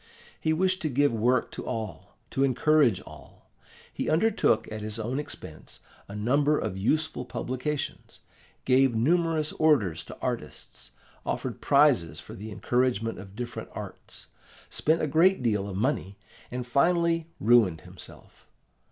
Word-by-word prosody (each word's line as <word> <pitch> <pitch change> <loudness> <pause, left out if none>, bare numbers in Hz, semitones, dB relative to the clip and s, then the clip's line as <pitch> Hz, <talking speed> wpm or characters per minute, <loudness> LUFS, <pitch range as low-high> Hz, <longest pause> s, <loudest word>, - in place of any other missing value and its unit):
He 160 - 0
wished 185 +3 +1
to 155 - -1
give 145 0 +2
work 120 +2 +1
to - - -6
all, 110 -5 -6
to 135 - +1
encourage 135 -4 +3
all. - - -15 0.4
He - - -2
undertook, 165 - +2
at 110 0 -5
his 105 +1 -4
own 120 +5 -2
expense, 150 - -9 0.3
a 100 - -8
number 140 +8 +2
of 105 -4 -3
useful 150 +7 0
publications; 130 +4 -4 0.5
gave 130 -1 +4
numerous 160 +4 +2
orders 125 - +2
to - - -10
artists; - - -6 0.3
offered - - -3
prizes 130 - +3
for - - -11
the 105 +3 -8
encouragement 115 -1 0
of 95 0 -11
different 120 +1 -6
arts; - - -9 0.5
spent 160 +2 +1
a - - +1
great 165 +2 +3
deal 105 -4 0
of 95 - -5
money, 100 -4 -1 0.3
and 125 0 -4
finally 165 +5 +2
ruined 105 -8 +4
himself. - - -13
125 Hz, 140 wpm, -27 LUFS, 110-155 Hz, 0.5 s, gave